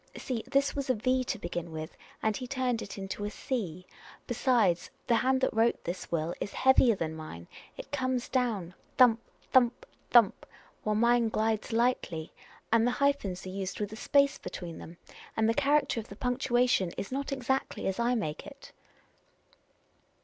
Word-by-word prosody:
See, 240 -4 -3
this 275 +1 +1
was 280 -2 -3
a 255 - +3
V 255 +3 +1
to - - -2
begin 175 -3 -5
with, 155 0 -6 0.3
and 220 -1 +2
he 255 - -5
turned 255 -3 -1
it 200 - -7
into 195 +1 -5
a 205 - -1
c. 190 - -4 0.4
Besides, 230 -8 +2 0.2
the 240 - +2
hand 260 +2 +2
that 260 - +1
wrote 225 +1 +2
this 175 +2 -5
will 165 0 0
is 205 - -4
heavier 260 -3 +5
than 160 -4 -3
mine: 155 - -9 0.3
it - - -9
comes 255 -3 -1
down 220 -9 -1 0.2
thump, 240 -3 +6 0.3
thump, 245 -2 +4 0.2
thump, 235 -5 +4 0.3
while 215 0 0
mine 235 +1 +3
glides 220 0 0
lightly. 225 -9 0 0.4
And 230 +1 +4
the 245 - -1
hyphens 280 -11 0
are - - -5
used 190 0 -4
with 210 0 -3
a - - -5
space 280 +4 +2
between 175 -2 -7
them, 170 +1 -10 0.4
and 220 0 +3
the 225 - +3
character 285 -1 +2
of 225 - -7
the 200 - -10
punctuation 245 -4 +1
is 195 - -4
not 275 +2 -3
exactly 265 0 -1
as 190 +2 -1
I 240 +1 +2
make 155 -10 -3
it." - - -12
230 Hz, 175 wpm, -30 LUFS, 190-255 Hz, 0.4 s, thump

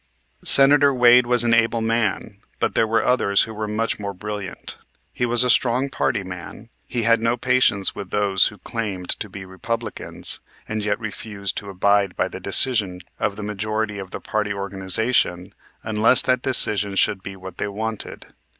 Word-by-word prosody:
Senator 140 +1 +7
Wade 125 -1 +5
was 120 -1 +3
an 120 -1 +2
able 115 0 +2
man, 110 -2 -2 0.2
but - - -1
there 110 - +1
were 110 0 0
others 100 -6 +2
who 110 - -7
were 110 0 -5
much 110 +2 -2
more 100 -1 -5
brilliant. 105 -1 -7 0.4
He 125 - -1
was 120 +1 +4
a 125 - 0
strong 130 +3 +2
party 115 -8 -1
man. 95 +4 -10 0.2
He 120 -2 -2
had 115 0 +3
no 115 +1 0
patience 115 -5 +1
with 100 -2 -8
those 100 -1 +2
who 105 - -9
claimed 100 -7 -5
to 105 - -2
be 95 0 -9
Republicans 95 +5 -4 0.3
and 110 -1 -4
yet 105 +1 -1
refused 105 -2 -5
to 100 - -6
abide 100 0 +1
by - - -1
the - - -8
decision 100 -8 +2 0.2
of 100 -2 -1
the 105 - -7
majority 105 0 -3
of 95 -1 -8
the - - -7
party 105 -1 -3
organization 95 -1 -2 0.3
unless 110 +3 +3
that 130 -1 +1
decision 105 -6 +4
should 95 0 +1
be 95 0 -8
what 95 -1 -11
they - - -2
wanted. 110 +2 -6
105 Hz, 175 wpm, -21 LUFS, 100-115 Hz, 0.4 s, Senator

